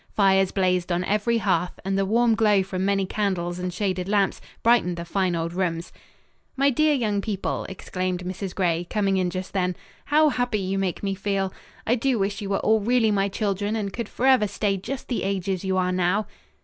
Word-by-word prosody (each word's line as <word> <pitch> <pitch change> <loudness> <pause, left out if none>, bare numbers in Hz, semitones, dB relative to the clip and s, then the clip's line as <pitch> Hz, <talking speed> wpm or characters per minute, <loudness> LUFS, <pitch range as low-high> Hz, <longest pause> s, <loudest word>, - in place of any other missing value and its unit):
Fires 195 -2 +4
blazed 185 -2 +1
on 175 +1 +1
every 210 +5 +1
hearth 180 -4 0
and 195 0 0
the 195 0 +1
warm 230 +2 +3
glow 210 -3 +3
from 185 -1 -3
many 195 0 +1
candles 180 -3 -2
and 180 0 -2
shaded 185 0 -2
lamps 200 -2 +1 0.2
brightened 225 -7 +3
the 170 - -5
fine 185 0 0
old 165 0 -2
rooms. 170 -2 -2 0.6
"My 275 +1 +4
dear 305 +3 +3
young 210 -6 0
people," 200 -2 -3
exclaimed 185 -1 -3
Mrs. 185 +1 -5
Gray, 175 -2 0
coming 195 -2 +1
in 185 -1 +1
just 185 +1 -5
then, 180 -2 0 0.3
"how 305 +2 +4
happy 245 -4 0
you 195 0 -1
make 190 -1 -2
me 195 -1 0
feel! 195 -1 -1 0.3
I 230 - +2
do 250 +1 +1
wish 200 +1 -1
you 200 - -4
were 195 - +1
all 220 0 +3
really 225 +1 +2
my 200 -1 +1
children 205 +1 -1
and 205 -3 -3
could 235 -3 -4
forever 255 -4 +3
stay 200 0 0
just 250 +8 -6
the 245 - -2
ages 195 -1 -2
you 190 -1 0
are 185 0 +1
now." 185 +3 +1
195 Hz, 200 wpm, -24 LUFS, 185-215 Hz, 0.6 s, Fires